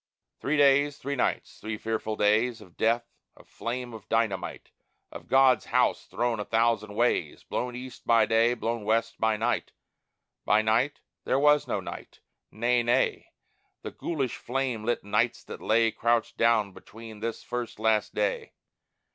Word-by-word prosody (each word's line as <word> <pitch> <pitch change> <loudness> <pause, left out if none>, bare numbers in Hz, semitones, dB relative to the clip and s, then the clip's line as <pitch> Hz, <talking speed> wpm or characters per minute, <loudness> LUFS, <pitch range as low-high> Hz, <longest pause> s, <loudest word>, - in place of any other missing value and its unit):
Three 150 +3 0
days, 145 0 +4
three 140 +1 -4
nights, 125 - -2
three 110 0 -4
fearful 110 0 -3
days 110 +3 +2
Of 90 -5 -16
death, 115 +1 +1 0.3
of - - -18
flame, 120 0 -5
of 110 -3 -11
dynamite, 110 -5 -1 0.4
Of - - -10
God's 135 -1 +4
house - - +1
thrown 120 -2 -1
a - - -1
thousand 110 -2 +1
ways; 120 +2 0
Blown 125 0 -3
east 125 0 -9
by 115 -2 +5
day, 115 +2 +3
blown 115 -1 -3
west 115 +2 0
by 110 -1 +2
night 115 +3 -1 0.7
By 110 - +3
night? 115 +6 +1 0.2
There 130 - +1
was 150 +1 +4
no - - -1
night. - - -9 0.3
Nay, 120 +2 +1
nay, 120 +1 +1 0.5
The - - -5
ghoulish 140 -7 -3
flame 125 -3 -2
lit 120 - 0
nights 100 - 0
that - - -9
lay 115 +1 +3
Crouched 115 +1 0
down 115 -3 +2
between 110 +1 -12
this 115 +1 -4
first, 120 -1 -5
last 110 -1 +1
day. 105 -1 -1
115 Hz, 155 wpm, -27 LUFS, 110-125 Hz, 0.7 s, by